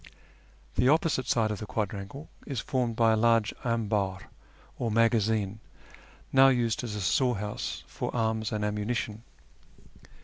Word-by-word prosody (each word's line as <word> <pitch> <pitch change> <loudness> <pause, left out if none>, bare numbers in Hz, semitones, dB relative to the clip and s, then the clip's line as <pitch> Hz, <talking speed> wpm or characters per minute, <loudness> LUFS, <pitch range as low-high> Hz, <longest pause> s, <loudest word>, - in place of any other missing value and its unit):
The 125 - +4
opposite 150 -4 +2
side 110 -3 +2
of 105 - -3
the 110 - -6
quadrangle 105 +8 -4 0.2
is 135 -5 -3
formed 125 -3 -1
by 115 -1 +4
a - - +3
large 115 -1 +3
amhdr, 105 -5 -1 0.6
or 120 - 0
magazine, 110 -2 +2 0.7
now 135 0 +8
used 120 -3 +1
as 110 -4 -4
a 105 - -3
storehouse 105 -1 -1
for - - -5
arms 110 -2 0
and 105 -1 -1
ammunition. 105 +1 -2
110 Hz, 135 wpm, -28 LUFS, 105-120 Hz, 0.7 s, now